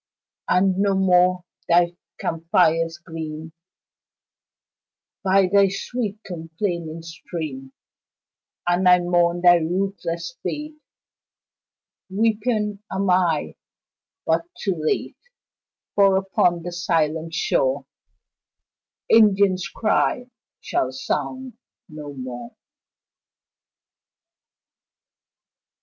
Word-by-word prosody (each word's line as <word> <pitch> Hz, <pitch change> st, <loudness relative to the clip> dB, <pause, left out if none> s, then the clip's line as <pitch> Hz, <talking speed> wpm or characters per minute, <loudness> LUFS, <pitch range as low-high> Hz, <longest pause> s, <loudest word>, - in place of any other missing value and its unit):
And 190 Hz, 0 st, +3 dB
no 200 Hz, -1 st, +2 dB
more 180 Hz, -1 st, +3 dB, 0.3 s
thy 175 Hz, 0 st, +4 dB, 0.2 s
camp 165 Hz, 0 st, -4 dB
fires 165 Hz, -1 st, +3 dB
gleam 160 Hz, -1 st, -7 dB, 1.7 s
By 195 Hz, 0 st, +4 dB
thy 200 Hz, -1 st, +6 dB
sweet, 210 Hz, +2 st, -4 dB
complaining 165 Hz, -1 st, -4 dB
stream; 155 Hz, -5 st, -7 dB, 1.0 s
And 180 Hz, +1 st, +3 dB
I 180 Hz, -, +8 dB
mourn 175 Hz, 0 st, +2 dB
thy 175 Hz, 0 st, +7 dB
ruthless 170 Hz, +3 st, -3 dB
fate; 300 Hz, 0 st, -5 dB, 1.3 s
Weeping 210 Hz, 0 st, 0 dB
am 190 Hz, 0 st, 0 dB
I 175 Hz, -4 st, +1 dB, 0.7 s
but 165 Hz, +1 st, +1 dB
too 195 Hz, -, 0 dB
late 155 Hz, -, -1 dB, 0.7 s
For 195 Hz, -1 st, +4 dB
upon 180 Hz, -3 st, +1 dB
that 175 Hz, -, -5 dB
silent 165 Hz, -2 st, -1 dB
shore -, -, +1 dB, 1.2 s
Indian's 200 Hz, -4 st, +4 dB
cry 245 Hz, +3 st, 0 dB, 0.3 s
shall -, -, -1 dB
sound 260 Hz, -3 st, -4 dB, 0.3 s
no 150 Hz, -3 st, -8 dB
more. 125 Hz, -2 st, -8 dB
180 Hz, 80 wpm, -23 LUFS, 165-195 Hz, 1.7 s, I